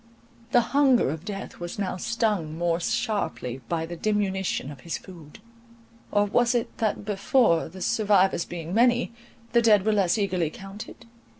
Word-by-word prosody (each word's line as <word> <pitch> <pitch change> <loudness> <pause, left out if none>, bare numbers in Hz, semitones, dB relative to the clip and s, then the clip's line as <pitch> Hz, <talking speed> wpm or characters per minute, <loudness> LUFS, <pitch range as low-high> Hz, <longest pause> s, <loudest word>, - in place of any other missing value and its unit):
The 245 - +5
hunger 270 - +4
of 160 +1 -6
Death 200 -2 -6
was 175 0 -6
now 200 -2 -2
stung 205 -7 -1
more 170 0 +1
sharply 135 - -2
by 165 -1 -1
the 175 +1 -7
diminution 190 -6 -1
of 140 - -11
his 165 +5 -4
food: 165 -4 -13 0.7
or 205 0 +3
was 240 +4 +2
it 235 - -1
that 215 -2 -1
before, 200 -3 +2
the 185 +2 -7
survivors 200 -5 +3
being 170 0 -6
many, 240 +2 +3 0.4
the 235 - +4
dead 210 -4 +4
were 215 - +3
less 195 -1 +2
eagerly 185 -6 0
counted? 195 +6 -10
195 Hz, 160 wpm, -26 LUFS, 170-220 Hz, 0.7 s, The